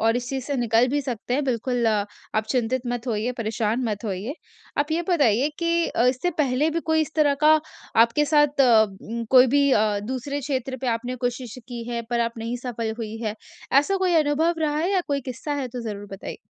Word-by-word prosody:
और 225 +1 +3
इस 245 0 -4
चीज़ 265 -2 -3
से 280 0 -2
निकल 235 0 +3
भी 290 +3 0
सकते 245 -1 -3
हैं, 290 - 0
बिल्कुल, 245 -1 0
आप 210 0 -1
चिंतित 250 +1 0
मत 245 0 -3
होइए, 230 +1 -1
परेशान 225 +2 -1
मत 210 -1 -3
होइए। 210 +7 -3 0.4
आप 295 +2 +1
ये 340 +2 +1
बताइए 280 - +3
कि 335 0 +1
अ, 235 - +1
इससे 260 +8 +1
पहले 285 +1 +2
भी 335 +1 -1
कोई 315 - +4
इस 310 0 -3
तरह 290 -2 +4
का 310 0 +7 0.4
आपके 235 +6 +2
साथ, 295 -2 +3
उ 225 -2 +2
कोई 255 0 +8
भी 280 +2 +3
अ, 210 -2 +2
दूसरे 260 +4 -3
क्षेत्र 265 -1 -3
पे 265 - -3
आपने 245 +2 -4
कोशिश 245 -1 -5
की 240 -1 -5
है, 235 -1 -2
पर 240 -1 +1
आप 230 0 -2
नहीं 230 +2 -3
सफल 230 -2 -2
हुई 220 -1 -5
हैं, 215 -1 -2 0.4
ऐसा 290 +9 +4
कोई 370 -2 +1
अनुभव 315 +4 +1
रहा 300 -2 0
है? 345 +5 0
या 380 - +3
कोई 280 -1 0
किस्सा 275 +4 -5
है, 255 - -4
तो 245 +1 -6
ज़रूर 205 -2 -6
बताइए। 195 - -7
250 Hz, 215 wpm, -24 LUFS, 230-290 Hz, 0.4 s, कोई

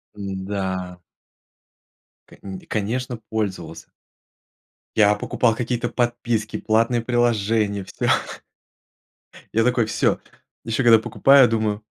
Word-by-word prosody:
М, 95 -2 -5
да. 95 -2 -4 1.3
Конь 95 -1 -9
конечно, 120 +4 -2
пользовался. 95 -7 -4 1.1
Я 105 -1 +5
покупал 115 +2 0
какие-то 120 0 -2
подписки, 120 -2 -1
платные 115 +2 +1
приложения 110 -4 0
всё. - - -4 1.5
Я 115 - +3
такой: 120 -1 +2
всё. 110 - 0 0.5
Еще 115 +3 -1
когда 115 -1 +7
покупаю, 135 +4 +5
думаю: 110 -2 -1
110 Hz, 95 wpm, -22 LUFS, 100-120 Hz, 1.5 s, когда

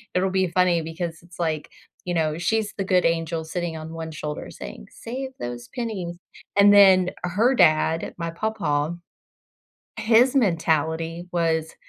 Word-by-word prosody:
it'll 190 +1 +2
be 190 -1 +2
funny 175 -1 +2
because 165 0 -5
it's 175 +1 -16
like, 160 -3 -2 0.4
you 180 - -2
know, 155 -1 0
she's 215 +3 0
the 195 - -2
good 185 -1 +3
angel 165 -1 0
sitting 170 0 -4
on 160 +1 -7
one 165 -1 -5
shoulder 150 -1 -6
saying, 60 0 -9
"Save 260 +3 -6
those 120 0 -6
pennies," 200 -8 -4 0.4
and 205 0 +7
then 190 -3 +7 0.2
her 215 +9 +2
dad, 160 -3 +3
my 170 -1 -3
papa, 165 -6 -1 1.0
his 235 +5 +4
mentality 165 - 0
was, 160 -2 0
170 Hz, 145 wpm, -24 LUFS, 160-190 Hz, 1.0 s, and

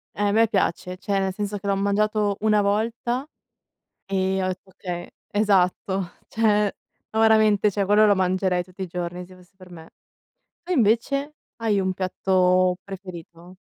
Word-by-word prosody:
Eh, 205 - -4
a - - +1
me 225 +2 +4
piace, 185 -2 -1
cioè 200 +1 -2
nel 190 -1 -1
senso 205 0 -3
che 200 - -12
l'ho 200 -1 +1
mangiato 205 +1 +1
1 210 -1 +3
volta 230 +6 -1 0.8
e 190 0 0
ho 185 - 0
detto: 185 +1 -6
"Okay" 180 -2 -6 0.3
esatto; 190 -2 +1 0.2
cioè, 210 -2 +2 0.4
no, 220 - -1
veramente 215 -2 +4
quello 205 +2 +3
lo 205 -1 +5
mangerei 185 -1 +1
tutti 185 +2 -10
i - - -3
giorni 175 +1 -5
se 185 +1 -15
fosse 180 +1 -20
per 185 -1 -15
me. 165 -2 -12 0.7
Tu 360 +1 -4
invece? 275 - +1 0.2
Hai 215 -4 0
un 190 0 0
piatto 185 -1 +2
preferito? 180 -2 -10
195 Hz, 160 wpm, -24 LUFS, 185-210 Hz, 0.8 s, lo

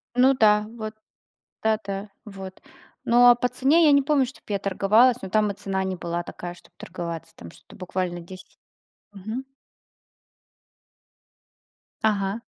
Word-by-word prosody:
Ну 255 +2 +5
да, 210 -4 +3
вот 215 -1 -6 0.7
да, 220 -1 +2
да. 195 +1 -5 0.2
Вот. 195 -2 -10 0.4
Ну 245 +1 +6
а 245 - +8
по 250 +1 0
цене 275 +7 +3
я 295 - +6
не 280 0 +5
помню, 280 -1 +2
чтобы 255 - -13
я 200 - -1
торговалась, 210 +6 +3
но 190 - -6
там 210 +1 +2
и - - -6
цена 195 -1 -3
не 190 0 -2
была 170 0 -4
такая, 175 0 -8
чтобы 175 - -20
торговаться. 170 -2 -7
Там 85 - -11
что-то - - -18
буквально 185 -1 -3
10. 185 +2 -13 0.5
Мгм. 215 +6 -6 2.6
Ага. 205 -1 0
205 Hz, 150 wpm, -24 LUFS, 185-240 Hz, 2.6 s, а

